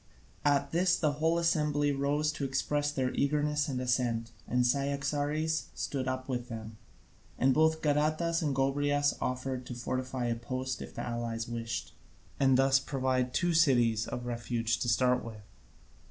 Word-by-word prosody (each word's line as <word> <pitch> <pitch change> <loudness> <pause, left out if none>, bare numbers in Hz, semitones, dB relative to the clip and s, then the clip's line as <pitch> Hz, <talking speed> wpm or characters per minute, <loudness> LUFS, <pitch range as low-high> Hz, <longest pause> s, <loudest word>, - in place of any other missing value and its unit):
At 140 -1 +2
this 180 +2 +3
the 155 -3 +1
whole 160 +3 +1
assembly 150 -3 +2
rose 145 +2 +1
to 155 -2 -5
express 145 +2 0
their 130 -3 -1
eagerness 150 +1 +1
and 130 -3 -2
assent, 120 -2 0 0.2
and 125 0 +2
Cyaxares 145 +4 0
stood 135 -2 -3
up 130 0 -3
with 125 -2 -3
them. 110 -1 -7 0.6
And 130 0 +3
both 160 +2 +2
Gadatas 155 +3 +1
and 145 -4 0
Gobryas 145 +2 +2
offered 130 0 -2
to 125 - -6
fortify 130 +1 -3
a 120 -1 0
post 130 +2 -4
if - - -9
the - - -4
allies 120 -1 -3
wished, 115 0 -4 0.5
and 135 -2 +4
thus 135 0 +4
provide 130 -2 -1
two 175 +5 +1
cities 120 -9 +3
of 120 - -5
refuge 115 -1 -1
to 120 - -1
start 125 +1 +3
with. 110 -2 -9
135 Hz, 155 wpm, -31 LUFS, 125-145 Hz, 0.6 s, and